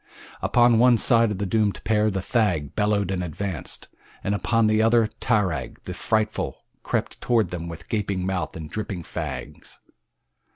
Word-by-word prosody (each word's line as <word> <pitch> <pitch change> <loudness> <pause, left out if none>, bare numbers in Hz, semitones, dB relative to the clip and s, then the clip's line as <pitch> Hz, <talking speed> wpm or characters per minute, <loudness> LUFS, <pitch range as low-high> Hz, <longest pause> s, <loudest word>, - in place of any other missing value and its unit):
Upon 120 -2 +4
one 125 0 +6
side 115 0 +4
of 105 - -3
the 100 - -2
doomed 105 0 0
pair 110 -1 +2
the 95 -2 -3
thag 90 - 0
bellowed 105 -2 +1
and 90 -1 -1
advanced, 90 0 -5 0.4
and 100 - 0
upon 115 +3 +2
the 110 0 +3
other 115 0 +4
tarag, 95 - 0
the - - -6
frightful, 110 -1 -1 0.2
crept - - -3
toward 115 -7 +2
them 85 -1 -4
with 85 -1 -9
gaping 100 -4 -1
mouth 95 -1 -2
and 80 -1 -7
dripping 100 -1 -5
fangs. - - -7
105 Hz, 160 wpm, -24 LUFS, 90-110 Hz, 0.4 s, one